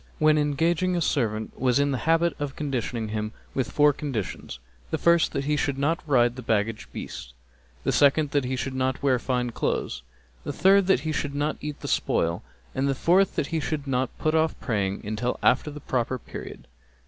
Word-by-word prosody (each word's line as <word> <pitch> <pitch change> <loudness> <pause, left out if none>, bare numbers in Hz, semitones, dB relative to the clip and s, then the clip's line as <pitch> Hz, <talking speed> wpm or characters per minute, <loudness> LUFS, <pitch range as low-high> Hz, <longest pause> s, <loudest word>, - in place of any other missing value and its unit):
when 155 0 +4
engaging 165 +5 +1
a - - +1
servant 110 -9 -1
was 125 -1 +3
in 140 0 +2
the 130 - -1
habit 165 +1 +3
of 145 -2 -3
conditioning 125 -6 -3
him 110 0 -3 0.2
with 130 - -1
four 145 0 +4
conditions; 130 - -4 0.3
the - - -1
first 170 -1 +3
that 140 -2 -2
he 150 +1 +1
should 140 -2 -1
not 155 +5 +1
ride 120 -4 +3
the 130 - -7
baggage 110 -1 -1
beasts, - - -7 0.5
the - - +1
second 145 +1 +4
that 145 -2 +2
he 130 +1 -2
should 130 +1 -3
not 130 0 -1
wear 130 -3 +3
fine 125 -1 -1
clothes, 60 - -2 0.4
the - - -3
third 195 0 +4
that 190 -10 +4
he 155 +1 -2
should 145 -2 -2
not 150 +2 0
eat 150 0 -4
of - - -27
the - - -3
spoil 85 +1 0 0.3
and 135 +1 0
the 135 - +1
fourth 185 +7 +3
that - - 0
he 160 - +2
should 150 -1 -3
not 130 -1 0
put 155 - 0
off 160 0 +1
praying 100 -4 -1
till 125 +2 -1
after 130 +4 +3
the 150 0 -8
proper 130 -2 -1
period. 115 - -9
140 Hz, 205 wpm, -26 LUFS, 125-155 Hz, 0.5 s, when